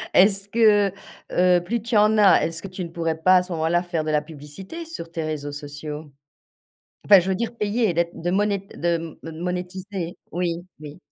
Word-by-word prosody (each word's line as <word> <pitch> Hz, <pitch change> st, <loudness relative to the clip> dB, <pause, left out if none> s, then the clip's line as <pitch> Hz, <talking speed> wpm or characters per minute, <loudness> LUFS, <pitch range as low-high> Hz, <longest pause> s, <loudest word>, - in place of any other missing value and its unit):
Est-ce 195 Hz, +1 st, +4 dB
que, 205 Hz, -3 st, +4 dB, 0.4 s
heu, 180 Hz, -1 st, +4 dB
plus 230 Hz, +4 st, -2 dB
tu 235 Hz, -1 st, -2 dB
en 215 Hz, +1 st, +4 dB
as, 200 Hz, -3 st, +6 dB
est-ce 165 Hz, 0 st, -4 dB
que -, -, -5 dB
tu 185 Hz, 0 st, -6 dB
ne 170 Hz, -, -6 dB
pourrais 165 Hz, -1 st, -2 dB
pas 185 Hz, +3 st, +5 dB
à 180 Hz, -, +2 dB
ce 180 Hz, -, -11 dB
moment-là 165 Hz, +2 st, +1 dB
faire 170 Hz, -3 st, -2 dB
de 155 Hz, -, -3 dB
la 150 Hz, 0 st, +2 dB
publicité 165 Hz, -, -9 dB
sur 170 Hz, -, -8 dB
tes 165 Hz, -1 st, -3 dB
réseaux 150 Hz, -2 st, -4 dB
sociaux? 145 Hz, +1 st, -7 dB, 1.0 s
Enfin 200 Hz, -2 st, +10 dB
je 185 Hz, -, -4 dB
veux 190 Hz, -, +1 dB
dire 235 Hz, +1 st, -3 dB
payer, 210 Hz, -3 st, 0 dB
d'être 170 Hz, 0 st, -1 dB
de 175 Hz, +1 st, -1 dB
moné 205 Hz, 0 st, +1 dB, 0.2 s
de 165 Hz, -2 st, -2 dB
me 165 Hz, -, -6 dB
monétiser. 180 Hz, +1 st, -5 dB, 0.2 s
Oui, 175 Hz, -1 st, -1 dB, 0.2 s
oui. 150 Hz, +2 st, -10 dB
175 Hz, 200 wpm, -23 LUFS, 160-200 Hz, 1.0 s, Enfin